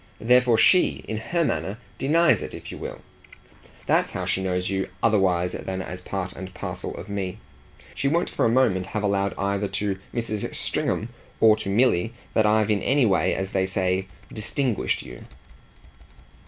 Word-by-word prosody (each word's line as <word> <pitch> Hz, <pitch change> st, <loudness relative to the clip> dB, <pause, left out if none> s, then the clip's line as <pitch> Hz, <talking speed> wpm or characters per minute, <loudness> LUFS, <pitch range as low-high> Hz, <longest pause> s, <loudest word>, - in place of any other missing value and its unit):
Therefore 125 Hz, 0 st, +4 dB
SHE, 185 Hz, +9 st, +4 dB
in 110 Hz, -, -3 dB
her 170 Hz, +10 st, 0 dB
manner, 100 Hz, -6 st, -2 dB, 0.2 s
'denies' 165 Hz, +5 st, +4 dB
it -, -, -6 dB
if -, -, -9 dB
you -, -, -8 dB
will. -, -, -7 dB, 0.8 s
That's -, -, +2 dB
how -, -, -3 dB
she 95 Hz, -, 0 dB
knows 90 Hz, -1 st, -1 dB
you 95 Hz, -1 st, -1 dB
otherwise 95 Hz, -5 st, +3 dB
than 95 Hz, 0 st, -4 dB
as 90 Hz, -1 st, -6 dB
part 90 Hz, 0 st, -4 dB
and 95 Hz, +1 st, -8 dB
parcel 90 Hz, -2 st, -5 dB
of 95 Hz, -, -8 dB
me. 100 Hz, -3 st, -3 dB, 0.6 s
She 140 Hz, -, -1 dB
won't 170 Hz, +5 st, +2 dB
for -, -, -2 dB
a -, -, +4 dB
moment 110 Hz, -7 st, +2 dB
have 105 Hz, +1 st, -3 dB
allowed 100 Hz, -1 st, +1 dB
either 100 Hz, +1 st, 0 dB
to 100 Hz, -1 st, -2 dB
Mrs. 115 Hz, -3 st, -3 dB
Stringham -, -, -1 dB, 0.3 s
or 110 Hz, -1 st, +7 dB
to 100 Hz, -, -4 dB
Milly 115 Hz, 0 st, +2 dB, 0.2 s
that 110 Hz, -, +3 dB
I've 110 Hz, 0 st, +3 dB
in 105 Hz, -, +1 dB
any 135 Hz, 0 st, +3 dB
way, 95 Hz, -4 st, +2 dB
as 95 Hz, 0 st, -3 dB
they 95 Hz, -1 st, +1 dB
say, 95 Hz, 0 st, 0 dB, 0.3 s
distinguished 115 Hz, +2 st, -1 dB
you." 60 Hz, -1 st, -10 dB
100 Hz, 170 wpm, -25 LUFS, 95-115 Hz, 0.8 s, or